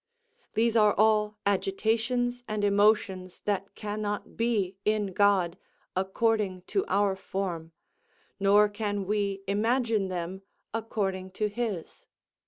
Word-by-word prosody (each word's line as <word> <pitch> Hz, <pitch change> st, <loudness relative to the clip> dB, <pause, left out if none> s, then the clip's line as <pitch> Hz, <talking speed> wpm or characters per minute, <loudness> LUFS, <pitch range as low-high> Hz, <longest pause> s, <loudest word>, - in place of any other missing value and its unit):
These 230 Hz, +1 st, +2 dB
are 210 Hz, -2 st, +5 dB
all 215 Hz, 0 st, +3 dB
agitations 225 Hz, +5 st, 0 dB
and 215 Hz, -1 st, -2 dB
emotions 200 Hz, -3 st, +2 dB
that 200 Hz, -1 st, -2 dB
cannot 210 Hz, -1 st, -4 dB
be 215 Hz, -5 st, 0 dB
in 210 Hz, -2 st, 0 dB
God, 190 Hz, -3 st, +3 dB, 0.4 s
according 190 Hz, 0 st, 0 dB
to 390 Hz, -, +3 dB
our 200 Hz, -1 st, +2 dB
form, 180 Hz, -4 st, -4 dB, 0.7 s
nor 205 Hz, +1 st, +5 dB
can 205 Hz, -1 st, -3 dB
we 200 Hz, -1 st, -1 dB
imagine 225 Hz, 0 st, +1 dB
them, 185 Hz, +1 st, -4 dB, 0.3 s
according 195 Hz, -4 st, -2 dB
to 210 Hz, +2 st, -1 dB
his. 205 Hz, -6 st, -4 dB
205 Hz, 110 wpm, -28 LUFS, 190-215 Hz, 0.7 s, are